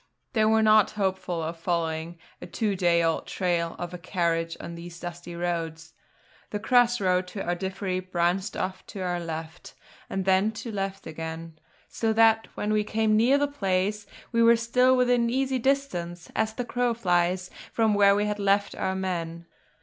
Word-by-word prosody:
They 220 -3 +3
were 220 0 +4
not 215 -1 +6
hopeful 190 -4 -1
of 165 +1 -5
following 165 -1 -2 0.2
a - - -7
two 210 -4 -1
day 175 -2 +3
old 165 -1 0
trail 170 -3 -1
of 175 0 -6
a 180 - -6
carriage 170 -2 -1
on 170 - -7
these 170 0 -9
dusty 175 0 -7
roads. 165 -2 -3 0.6
The 210 - -2
cross 245 +2 +3
road 185 -1 +1
to 195 +2 -5
Ardiffery 190 +1 -2
branched 180 +3 0
off 185 0 -3
to 195 - -7
our 180 -1 -1
left, 165 0 -7 0.3
and 195 -1 -2
then 190 +3 +3
to 225 +2 -6
the - - -7
left 195 0 -3
again; 160 0 -7 0.3
so 225 -1 -1
that 225 0 +4
when 210 +1 -1
we 210 0 +2
came 215 0 +1
near 240 +6 +4
the 290 0 +1
place, 200 -5 -1 0.2
we 230 -1 +2
were 230 0 +6
still 250 +3 +3
within 245 -2 +3
easy 265 +1 0
distance, 180 -11 -1
as 220 0 0
the 245 - -3
crow 245 0 0
flies, 180 -3 +1 0.2
from 220 -2 +2
where 200 -1 +5
we 205 +1 +1
had 210 0 -2
left 200 0 +2
our 190 0 -2
men. 170 -3 -3
190 Hz, 180 wpm, -26 LUFS, 175-220 Hz, 0.6 s, not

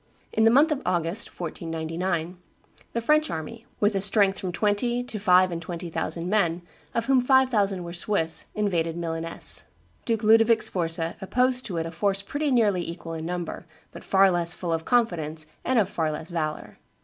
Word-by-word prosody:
In 220 - +3
the - - +7
month 285 +7 +5
of 290 -2 -1
August, 175 +1 -1
1499, 165 +1 -3 0.5
the 235 - -1
French 305 +5 +3
army, 225 +9 -6
with 205 +1 +3
a 195 - 0
strength 200 -1 +3
of - - -4
from 185 - -3
twenty 215 +6 0
to 230 -4 -5
five 185 -2 +4
and 165 -1 -4
twenty 170 0 -6
thousand 165 +2 -2
men, 175 -4 +1 0.3
of 230 - 0
whom 265 -1 +4
five 260 +1 +4
thousand 200 -6 +1
were 170 0 -7
Swiss, 170 -3 0
invaded 170 -6 0
Milaness. 165 -1 -5 0.4
Duke 225 -2 -1
Ludovic 225 +1 +5
Sforza 165 -5 0
opposed 250 +5 +1
to 180 -5 -4
it 165 - -1
a 165 - -5
force 195 +3 -1
pretty 290 +8 -2
nearly 215 -8 +3
equal 170 -1 -6
in 160 0 -5
number, 175 -1 -5 0.2
but - - -11
far 195 0 +4
less 175 -1 0
full 170 -2 -3
of 160 0 -2
confidence 165 -10 0 0.2
and 255 - +1
of 210 -5 +4
far 160 -4 -1
less 155 +2 -6
valor. 155 -3 -4
185 Hz, 185 wpm, -25 LUFS, 165-225 Hz, 0.5 s, the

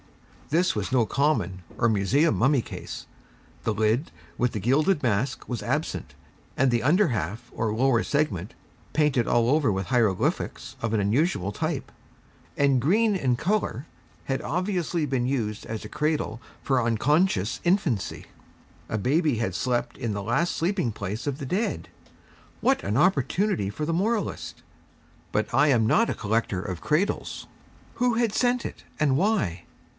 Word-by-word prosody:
This 170 +5 +2
was 105 +1 -2
no 125 -3 +3
common, 140 -9 0 0.2
or 115 - +3
museum 115 - +2
mummy 135 +2 +3
case. - - -8 0.6
The 110 - 0
lid, 110 +7 +1 0.3
with 125 0 +1
the 110 - -3
gilded 145 - +2
mask, 120 +2 -1
was 120 -4 -4
absent, - - -2 0.4
and 135 -1 +3
the 120 -1 +1
under 180 +10 +4
half 105 -1 -3
or 110 -1 -1
lower 120 0 +2
segment, 115 - -1 0.4
painted 145 -6 +2
all 120 -1 +3
over 145 -5 +3
with 95 0 -2
hieroglyphics 110 -4 0
of 115 - -1
an 110 - +2
unusual 105 - +1
type, - - -3 0.7
and 140 -3 +3
green 210 - +3
in 130 -9 +1
colour 170 - -1 0.4
had 135 -1 -1
obviously 175 0 -1
been 130 -3 0
used 110 -6 -2
as 110 -1 -5
a - - -5
cradle 150 -5 -1 0.2
for 130 -2 +2
unconscious 120 - +1
infancy. 170 - 0 0.6
A 110 - -1
baby 145 - +2
had 110 -5 -1
slept 120 +2 -1
in 115 -5 -2
the 100 0 -3
last 130 - 0
sleeping 175 - 0
place 105 +4 -5
of 140 -2 -1
the 140 - -6
dead! 155 - -1 0.7
What - - +2
an 105 +3 0
opportunity 170 - +2
for 125 +9 -4
the 165 - -1
moralist! 210 +5 -2 0.7
But - - -1
I 150 - +5
am 120 -6 +4
not 230 - +3
a - - -1
collector 110 -3 -1
of 90 -3 -5
cradles. 160 +7 -1 0.5
Who 245 -1 +1
had 230 -3 +1
sent 245 +1 +1
it, - - -7 0.2
and 145 -3 +3
why? 140 - 0
130 Hz, 155 wpm, -26 LUFS, 110-160 Hz, 0.7 s, I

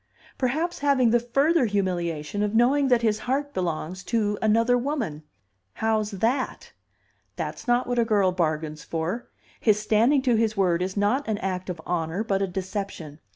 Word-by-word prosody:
Perhaps 310 +7 -1
having 275 -5 +3
the 240 - +4
further 275 +5 +2
humiliation 180 -3 -2
of 210 +1 0
knowing 270 +5 +4
that 245 -2 +3
his 215 -1 +2
heart 285 +2 -1
belongs 180 +1 -3
to 210 -3 0
another 230 +3 +3
woman. 245 - -2 0.5
How's 220 -1 0
that? 230 +6 -2 0.6
That's - - -5
not 240 +1 +3
what 245 -1 -1
a - - +5
girl 205 -5 +2
bargains 155 -3 -2
for. 170 +9 -3 0.3
His 210 -2 +3
standing 230 +6 +3
to 250 -3 +3
his 220 -1 +1
word 180 -3 +2
is 185 +2 -3
not 225 +8 +1
an 215 -2 0
act 185 -1 -3
of 175 -2 -4
honor, 170 +3 -1
but 195 -3 0
a 195 - +1
deception. 185 -5 -5
215 Hz, 165 wpm, -25 LUFS, 185-245 Hz, 0.6 s, a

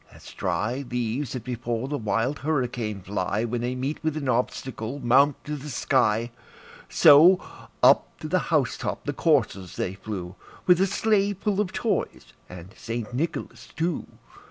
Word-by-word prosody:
As - - -13
dry 120 +6 -2
leaves 125 +2 -2
that 125 -4 -5
before 120 0 -3
the 145 - -2
wild 115 +6 -1
hurricane 125 -8 -2
fly, 100 +2 -2
When 120 0 -2
they 125 +1 -2
meet 135 +5 -3
with 155 -1 -1
an 140 -3 -3
obstacle, 125 0 -2
mount 135 +2 +3
to 150 - -4
the 150 +1 -8
sky, 120 -3 +1 0.6
So, 165 +6 +7 0.4
up - - +6
to - - -4
the - - +2
house - - +1
top - - -4
the - - -2
coursers 95 -2 +1
they 90 - -2
flew, 95 -3 -6 0.3
With 180 0 +5
a 195 - +4
sleigh 205 0 +1
full 200 +1 0
of 190 -3 -2
toys - - -2 0.2
and 90 +2 -11
St. 115 0 -5
Nicholas 155 +7 -4
too. 165 0 -2
125 Hz, 160 wpm, -25 LUFS, 110-150 Hz, 0.6 s, So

